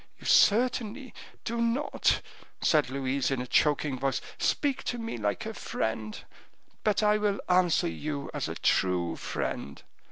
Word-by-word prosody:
"You - - -15
certainly 240 +2 +3 0.3
do 235 0 -2
not," 235 +5 +1 0.4
said 150 -5 +3
Louise, 135 0 -1
in 135 -2 -1
a 125 - -3
choking 145 0 +2
voice, 135 0 0 0.2
"speak 285 -3 0
to 245 - -2
me 230 - -4
like 105 -3 -2
a - - -4
friend; 110 -1 -3 0.7
but 210 0 +2
I 210 0 +4
will 205 -1 0
answer 180 -2 +3
you 140 - -4
as - - -2
a - - -4
true 90 -3 +1
friend." 70 -3 -4
150 Hz, 150 wpm, -29 LUFS, -, 0.7 s, I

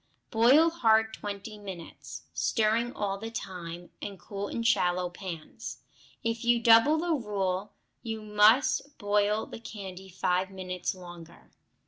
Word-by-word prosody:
Boil 265 +9 +6
hard 220 -7 +3
twenty 205 +1 -6
minutes, 190 -5 -9
stirring 225 +2 +1
all 200 -1 -2
the 225 +2 -5
time, 175 -5 -7
and 200 -2 -6
cool 200 0 -5
in 230 - -3
shallow 180 -5 +2
pans. 175 -3 -7 0.4
If 230 0 -1
you 240 0 +4
double 230 +7 +6
the 340 +1 0
rule 200 -6 -2 0.3
you 220 -2 -5
must 225 +7 +3
boil 205 +1 +1
the - - -9
candy 190 -4 -8
five 185 +1 0
minutes 185 -1 -4
longer. 175 -2 -12
205 Hz, 130 wpm, -29 LUFS, 185-230 Hz, 0.4 s, Boil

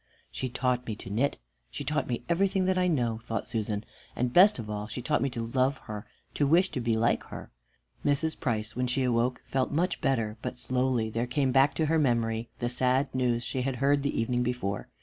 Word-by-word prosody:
"She 130 - -3
taught 125 0 -1
me 110 - -2
to 100 - -9
knit, 130 +7 +1 0.3
she 145 - -6
taught 150 0 -1
me 120 -1 -3
everything 190 +2 +2
that 185 0 +2
I 180 0 +2
know," 120 -9 0
thought 115 -1 -4
Susan, 105 -2 -2 0.3
"and 125 0 -1
best 195 +4 +7
of 115 -3 -6
all, 105 0 -4
she 115 +3 -6
taught 135 +5 0
me 135 - +1
to 120 -2 -4
love 130 +4 +1
her, 105 -1 -6 0.3
to 145 - +1
wish 175 +6 +4
to 135 - -3
be 115 -1 +1
like 115 +1 +2
her." - - -9 0.5
Mrs. 145 +2 0
Price, 110 -3 -2
when 125 +1 0
she 130 +2 0
awoke, 125 0 +1
felt 130 -1 -1
much 170 +5 0
better, 115 -8 0
but 125 - -4
slowly 125 -3 0
there 115 +2 -1
came 135 +1 +1
back 135 +2 +4
to 160 - +1
her 160 +1 +2
memory 115 -4 +1
the 120 - -1
sad 130 +3 +1
news 120 -2 +1
she 130 +1 -2
had 130 0 -1
heard 140 +3 +2
the 140 - -1
evening 120 +2 +1
before. 120 -5 -2
125 Hz, 220 wpm, -29 LUFS, 115-140 Hz, 0.5 s, best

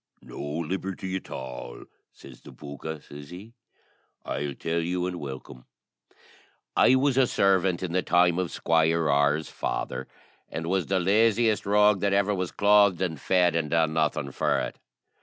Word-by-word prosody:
"No 65 -2 -9
liberty 95 +5 -4
at 95 - -6
all," 60 -2 -7 0.3
says 65 -3 -15
the - - -13
pooka, 75 +2 -8
says 70 0 -11
he: 100 +6 -11 0.7
"I'll 70 -2 -3
tell 85 0 -2
you, 90 +2 -1
and 90 -1 -4
welcome. 65 -3 -9 1.1
I 130 - +5
was 135 0 +2
a 130 -2 +4
servant 95 -4 +2
in 90 - -3
the 90 +1 +1
time 90 0 +3
of 90 -2 -1
Squire 80 -1 +1
R.'s 70 +2 +1
father, - - -4 0.4
and 80 - -5
was 90 0 -1
the 95 -1 +1
laziest 110 +3 +2
rogue 105 0 +4
that 100 +1 0
ever 100 +1 +2
was 90 -2 -2
clothed 100 -3 +4
and 85 -5 -2
fed, 90 -3 +2
and 80 -2 -1
done 80 -1 +1
nothing 75 -3 -1
for - - 0
it. - - -6
85 Hz, 160 wpm, -26 LUFS, 75-95 Hz, 1.1 s, I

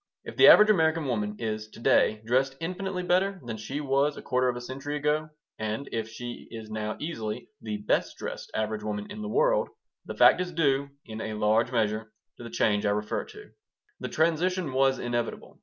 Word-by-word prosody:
If - - -8
the - - +7
average 210 0 +9
American 160 -4 +2
woman 105 -5 -1
is 110 -1 -3
to 110 - -14
day 110 -1 +3
dressed 130 +3 +1
infinitely 185 +2 -3
better 185 +2 +1
than 115 -2 -4
she 135 +7 -4
was 140 +1 +1
a - - -8
quarter 125 0 +1
of 125 - -1
a 120 - -5
century 135 +4 -5
ago, 150 +1 0 0.3
and 110 +5 -3
if 115 -1 -3
she 120 +2 -8
is 110 -2 -9
now 110 0 -3
easily 115 -10 -5
the 105 -1 -4
best - - 0
dressed - - -6
average 110 0 -1
woman 105 -1 -4
in 215 - -7
the 210 - -4
world, - - +2 0.4
the - - -6
fact - - +6
is 180 -1 -4
due, 140 -4 +1 0.2
in 110 -1 -7
a 110 - -4
large 110 +3 +2
measure, 110 -2 0 0.3
to - - -10
the 115 - -7
change 105 -2 +1
I - - +3
refer 105 +1 -1
to 420 0 -13 0.5
The - - -4
transition 170 0 +1
was 135 0 +3
inevitable. 120 -1 -4
125 Hz, 200 wpm, -27 LUFS, 110-160 Hz, 0.5 s, average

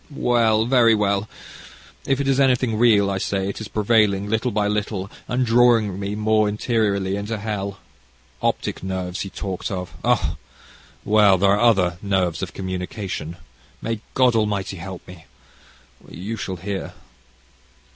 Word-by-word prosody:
"Well 115 -5 +2
very 120 -2 +5
well. 100 0 0 0.8
If 135 -1 +1
it 140 - -1
is 135 0 +2
anything 125 -4 +2
real, 105 -4 +4
I 95 - -2
say, 95 0 -1
it 100 - -6
is 110 - -5
prevailing, 105 -2 +2
little 110 +4 0
by 105 -2 0
little, 105 -2 -2 0.2
and 125 +1 0
drawing 115 -4 +3
me 100 +1 -3
more 110 0 +2
interiorly 105 -3 0
into 105 +2 -3
hell. 100 -2 -4 0.6
Optic - - -1
nerves, 95 -1 -4
he 100 - -4
talked 95 -1 -5
of. 90 -2 -5
Ah! 90 -10 +1 0.7
well 105 -2 +5
there 100 +1 +3
are 105 - +2
other 90 -7 +3
nerves 95 -4 0
of 95 - -4
communication. 95 -3 -5 0.4
May 115 -2 -3
God 125 -2 +4
Almighty 100 -3 -1
help 90 +1 -8
me! 90 -3 -13 0.8
You 100 +7 -5
shall 95 -2 -4
hear. 95 +2 -5
105 Hz, 145 wpm, -22 LUFS, 95-115 Hz, 0.8 s, very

